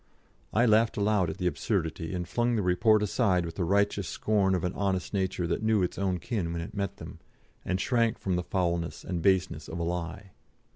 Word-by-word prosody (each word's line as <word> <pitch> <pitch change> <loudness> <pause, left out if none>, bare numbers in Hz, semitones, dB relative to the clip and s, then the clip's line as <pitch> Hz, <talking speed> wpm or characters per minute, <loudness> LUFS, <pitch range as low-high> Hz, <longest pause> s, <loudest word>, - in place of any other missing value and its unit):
I 120 +3 +3
laughed 110 0 +3
aloud 100 -4 +2
at 80 - -5
the 90 - -3
absurdity 85 -3 -1
and 90 -1 -3
flung 120 0 +1
the 105 - 0
Report 105 +4 +3
aside 95 -5 +1
with 85 - -5
the 90 - -2
righteous 100 +1 +1
scorn 100 -3 +1
of 90 - -2
an 90 - -1
honest 95 -2 -1
nature 95 -2 -1
that 85 - -1
knew 110 -3 +2
its 90 - -3
own 95 -2 0
kin 90 -3 -3
when 85 0 -3
it - - -9
met 100 -3 -3
them, - - -10 0.4
and 95 +1 -1
shrank 115 0 +1
from 95 -2 -1
the 90 - 0
foulness 85 -2 -2
and 90 -3 -3
baseness 95 -3 +1
of 85 - -6
a 85 - -2
lie. 90 +3 -4
95 Hz, 210 wpm, -28 LUFS, 85-105 Hz, 0.4 s, I